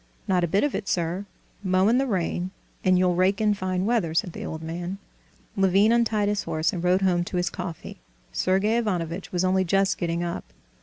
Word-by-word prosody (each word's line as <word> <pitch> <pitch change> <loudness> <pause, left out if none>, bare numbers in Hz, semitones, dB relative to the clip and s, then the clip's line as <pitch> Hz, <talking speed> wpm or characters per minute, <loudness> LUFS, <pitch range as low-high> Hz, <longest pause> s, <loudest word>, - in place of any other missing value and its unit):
"Not 185 -3 +2
a - - +2
bit 195 +5 +2
of 290 - 0
it, 200 - -3
sir; 175 +3 -1 0.4
mow 185 0 +3
in 240 +3 +4
the 270 - +1
rain, 180 -3 -1 0.3
and 185 -1 +4
you'll 180 -1 +3
rake 185 +3 +2
in 215 -1 +3
fine 185 -1 -2
weather!" 205 -9 0
said 170 +1 0
the - - -6
old 160 0 -5
man. 175 +4 -4 0.6
Levin 195 +3 +4
untied 225 -3 +2
his 205 0 0
horse 160 +5 0
and 175 -2 -4
rode 180 +2 +3
home 175 -2 +2
to 180 - -4
his 180 0 0
coffee. 175 -3 -7 0.3
Sergey 195 +5 +1
Ivanovitch 180 -5 -2
was 180 0 0
only 185 0 +3
just 195 +2 +1
getting 170 -1 -1
up. 170 -1 -3
185 Hz, 205 wpm, -25 LUFS, 175-200 Hz, 0.6 s, in